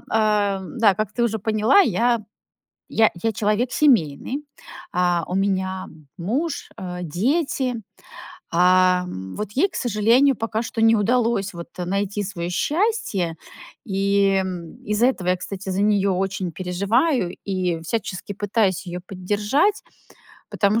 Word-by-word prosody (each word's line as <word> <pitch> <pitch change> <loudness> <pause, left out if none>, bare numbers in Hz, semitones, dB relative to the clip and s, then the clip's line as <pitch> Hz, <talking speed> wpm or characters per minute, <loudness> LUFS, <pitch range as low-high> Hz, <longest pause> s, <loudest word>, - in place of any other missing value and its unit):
да, 210 0 +2
как 215 0 -2
ты 240 - -1
уже 220 -1 0
поняла, 215 - +3
я 235 - +2 0.7
я 220 -1 +4
я 225 - +1
человек 215 +4 0
семейный. 255 - +2 0.5
А, 175 -1 +2
у 180 - -3
меня 190 -1 -1 0.3
муж, 270 - -2
э, 180 -1 -6
дети. 255 - 0 0.8
А 180 +1 +4 0.3
вот 210 -1 -4
ей, 375 +9 +2
к - - -14
сожалению, 240 +4 +3
пока 225 0 -2
что 225 -1 -4
не 225 0 +6
удалось 225 -2 +1
вот 170 0 -6 0.2
найти 200 +3 -1
свое 175 -3 -4
счастье. 290 - 0 0.5
И 195 -1 +2 0.5
из-за 210 +4 +2
этого 190 -9 -1
я, 180 - +3
кстати, 190 +1 -6
за 190 +2 0
нее 200 -2 +3
очень 190 -1 -2
переживаю 195 - 0
и 180 -4 -1
всячески 200 +1 -4
пытаюсь 205 -2 0
ее 175 0 -5
поддержать, 205 - 0 0.7
потому 210 +2 +2
205 Hz, 125 wpm, -22 LUFS, 185-230 Hz, 0.8 s, не